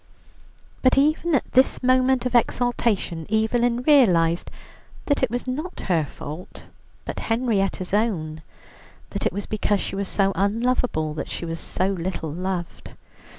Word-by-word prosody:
But 255 0 +4
even 310 +3 +3
at 265 - -1
this 260 0 +3
moment 255 0 +3
of 250 - -1
exaltation 235 -8 +1
Evelyn 235 +2 +1
realized 180 - +4 0.6
that 285 - +1
it 260 - +2
was 245 +2 -3
not 300 +8 -4
her 165 -5 +1
fault, 155 +5 -9 0.4
but - - -5
Henrietta's 205 -6 0
own; 165 -8 0 0.7
that - - -1
it - - -2
was 200 +3 -4
because 210 -1 0
she - - -4
was 200 0 -2
so 195 0 +1
unlovable 205 -6 0
that 150 - -5
she - - -4
was 165 0 -4
so 185 +1 -1
little 175 -4 -3
loved. 180 +1 -4
210 Hz, 145 wpm, -23 LUFS, 180-250 Hz, 0.7 s, But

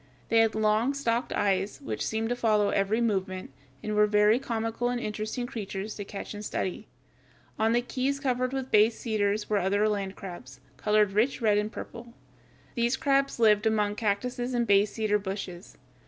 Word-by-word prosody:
They 230 - +4
had 225 -1 +3
long, 220 +5 +2
stalked 240 -3 -1
eyes, 195 0 0
which 110 -1 -4
seem 220 0 -1
to 245 - 0
follow 215 -4 +2
every 200 +4 +1
movement, 190 -4 -1 0.3
and 215 - -2
were 210 0 +4
very 210 +2 +4
comical 230 -1 -2
and 245 0 -1
interesting 215 +2 -3
creatures 210 -4 -5
to 205 - -6
watch 200 - -6
and 205 0 -7
study. 190 -3 -3 0.7
On 220 +1 +3
the 240 +1 +2
keys 270 +3 -1
covered 255 -2 0
with 265 -1 -4
bay 215 +1 +6
cedars 215 -2 -1
were 210 -1 +1
other 200 +3 +2
land 200 -2 -2
crabs 135 -9 -9 0.2
(Fig. - - -20
147), 210 0 +5
colored 195 -1 -10
rich 240 +6 +2
red 210 -3 +3
and 210 +1 -2
purple. 235 0 -9 0.6
These 235 +2 +1
crabs 275 -1 +1
lived 215 -2 +4
among 210 -2 +1
the - - -6
cactuses 245 +4 -1
and 240 -1 +1
bay 200 -1 +5
cedar 210 0 0
bushes. 190 -2 -6
215 Hz, 185 wpm, -28 LUFS, 205-240 Hz, 0.7 s, bay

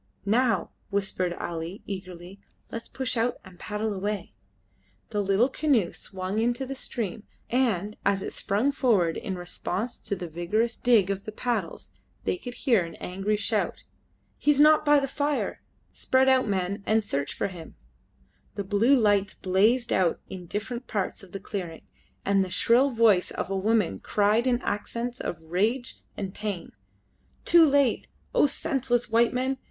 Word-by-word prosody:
"Now," 230 +3 +2 0.2
whispered 195 -3 -1
Ali, 170 +2 -5
eagerly, 185 -1 -8 0.3
"let 230 - -4
us - - -13
push 260 -1 -3
out 235 +1 0
and 185 -2 -14
paddle 210 0 -2
away." 200 0 -3 0.8
The 210 -2 0
little 200 +5 +3
canoe 265 - +1
swung 190 +2 -4
into 240 +3 0
the 270 - -5
stream, 230 -6 -4 0.3
and 215 -5 +1
as 195 -1 +1
it - - -4
sprung 220 +8 +1
forward 205 -12 +2
in 190 -5 -4
response 185 +6 -4
to 205 - -3
the 180 -2 -6
vigorous 195 +9 0
dig 220 -6 +3
of 195 0 -4
the 215 - -5
paddles 240 +3 -3 0.3
they - - 0
could 245 -9 -8
hear 230 -9 +4
an 165 - -8
angry 195 +3 -2
shout. 210 - -1 0.6
"He - - 0
is 290 -1 +5
not 305 +1 +7
by 295 -1 +5
the 275 - -1
fire. 285 +2 -1 0.3
Spread 260 0 +2
out, 260 -2 +4
men, 195 0 -1
and 220 0 +2
search 140 -6 -2
for - - -1
him!" 175 -4 -10 0.8
Blue 205 +7 +3
lights 205 -3 +2
blazed 215 +6 +2
out 180 -3 +2
in 180 -2 -8
different 235 +6 -4
parts 200 -3 -2
of 195 -3 -14
the 195 - -5
clearing, 180 -5 -6 0.4
and 195 -1 +3
the 185 - -5
shrill 240 +9 +4
voice 225 -7 +4
of - - -4
a - - 0
woman 200 - +1
cried 215 +4 +2
in 245 -1 +2
accents 235 +4 -3
of 175 - -3
rage 210 +10 -1 0.2
and 195 -2 -4
pain 205 -6 -5 0.7
"Too 335 -2 +7
late! 280 -3 +2 0.3
O - - +5
senseless 265 -6 -1
white 230 +1 +4
men! 260 +1 -1
210 Hz, 165 wpm, -27 LUFS, 190-245 Hz, 0.8 s, not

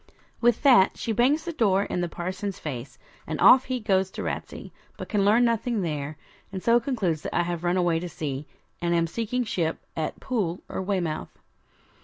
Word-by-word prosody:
With 240 +2 +3
that 245 -9 +6
she 230 - -2
bangs 260 - +2
the 340 - -3
door 200 -8 +2
in 180 - -2
the 175 - -1
parson's 185 +3 -4
face 130 -4 -6 0.3
and 155 -1 -3
off 260 0 +7
he 255 -1 -2
goes 190 -4 +1
to - - -6
Ratsey, - - -5 0.3
but - - -7
can 205 -2 +1
learn 220 +5 +5
nothing 230 -2 0
there, 150 -2 -3 0.3
and 190 -1 -6
so 235 +1 +5
concludes 210 - -1
that - - -5
I 175 - +3
have 170 -1 -4
run 175 +1 +1
away 175 -2 +2
to 175 +1 -5
sea, 145 -3 -5 0.3
and 170 0 +1
am 170 0 +3
seeking 230 +8 -2
ship 170 -7 -1 0.2
at 160 - -3
Poole 195 -9 -2
or - - -4
Weymouth. 180 -5 -2
190 Hz, 195 wpm, -26 LUFS, 165-230 Hz, 0.3 s, off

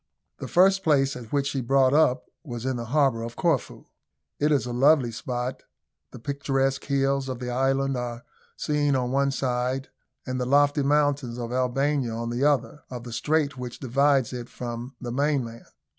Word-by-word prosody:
The - - -5
first 190 +2 +4
place 140 -4 +2
at 120 -3 -9
which 140 -1 +1
she 140 -1 -1
brought 130 +1 +3
up 135 -4 +3 0.2
was 120 -5 -6
in 130 -1 0
the 120 -1 -4
harbour 135 -2 +2
of 115 +1 -6
Corfu. - - -1 0.5
It 150 +1 +2
is 140 -6 +2
a 120 - -4
lovely 135 -1 +4
spot. 125 +2 -4 0.5
The - - -11
picturesque 135 +1 -1
hills 135 -1 0
of 130 - -3
the 125 0 -4
island 135 +2 +1
are 120 -1 -4 0.3
seen 145 -2 +1
on 125 -1 -1
one 140 +1 +2
side, 130 0 -1 0.4
and 130 0 -3
the 125 - -1
lofty 145 +2 +4
mountains 145 -3 +1
of 120 -1 -5
Albania 130 0 0
on 115 +1 -3
the 120 +3 -1
other, 150 0 +1
of 125 -2 -7
the 120 -1 -8
strait 140 +2 0
which 125 -1 -6
divides 135 0 +2
it 125 -1 -6
from 120 +2 -6
the 120 -1 -5
mainland. 130 -4 -1
130 Hz, 180 wpm, -26 LUFS, 125-140 Hz, 0.5 s, first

